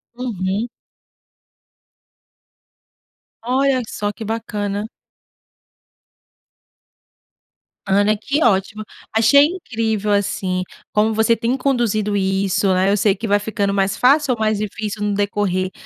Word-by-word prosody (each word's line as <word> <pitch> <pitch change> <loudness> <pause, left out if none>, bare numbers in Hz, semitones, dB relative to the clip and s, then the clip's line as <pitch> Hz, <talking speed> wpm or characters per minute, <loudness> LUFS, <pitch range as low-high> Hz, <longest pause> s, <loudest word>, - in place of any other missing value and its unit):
Uhum. 215 -2 -3 2.7
Olha 260 +2 +1
que 230 - -9
só 205 0 -2
que 220 - -8
bacana! 210 -1 -3 3.0
Ana, 205 +2 +3
que 280 +8 -1
ótimo, 215 0 +1 0.3
achei 280 +6 +6
incrível, 225 - -2
assim, 195 -2 0 0.3
como 215 +1 +2
você 220 +1 +3
tem 240 +4 -1
conduzido 225 -6 0
isso, 195 0 0
eh, 190 +2 +2
eu 205 - +2
sei 200 -1 +2
que 225 +3 -5
vai 205 0 +3
ficando 205 -1 -2
mais 195 0 0
fácil 275 +1 +4
ou 230 - -7
mais 215 -1 +1
difícil 215 0 -4
no 205 0 0
decorrer, 195 -2 -1
210 Hz, 115 wpm, -19 LUFS, 200-230 Hz, 3.0 s, achei